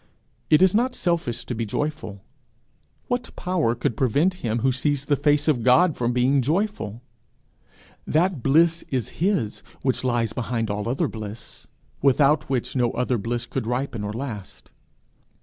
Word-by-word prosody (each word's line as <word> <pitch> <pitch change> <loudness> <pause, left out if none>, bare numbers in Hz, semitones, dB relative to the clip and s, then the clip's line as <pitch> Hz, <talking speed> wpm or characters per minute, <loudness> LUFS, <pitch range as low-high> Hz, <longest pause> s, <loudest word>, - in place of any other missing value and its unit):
It 155 +4 +6
is 190 - +5
not 250 +4 +1
selfish 170 -10 -1
to - - -4
be 115 0 -2
joyful. 115 -4 -4 0.8
What 245 0 -3
power 175 -10 0
could 120 -1 -1
prevent 140 - +2
him 115 -1 -1
who 135 - +4
sees 140 +2 -1
the 145 - +2
face 145 +1 +2
of 140 -6 +2
God 145 +8 +4
from 120 0 0
being 130 +3 +3
joyful? 145 - -2 1.0
that 170 -2 +1
bliss 165 +6 +3
is 130 -4 -1
his 175 - 0 0.2
which 130 -1 0
lies 120 -3 0
behind 115 -3 -2
all 105 +2 -3
other 145 +6 0
bliss, 110 -2 -9 0.3
without 140 +2 +3
which 130 -1 -2
no 125 -2 +2
other 125 -1 0
bliss 120 +3 -2
could 125 -2 -4
ripen 125 -2 -2
or 105 - -3
last. 110 -4 -7
130 Hz, 155 wpm, -24 LUFS, 115-155 Hz, 1.0 s, It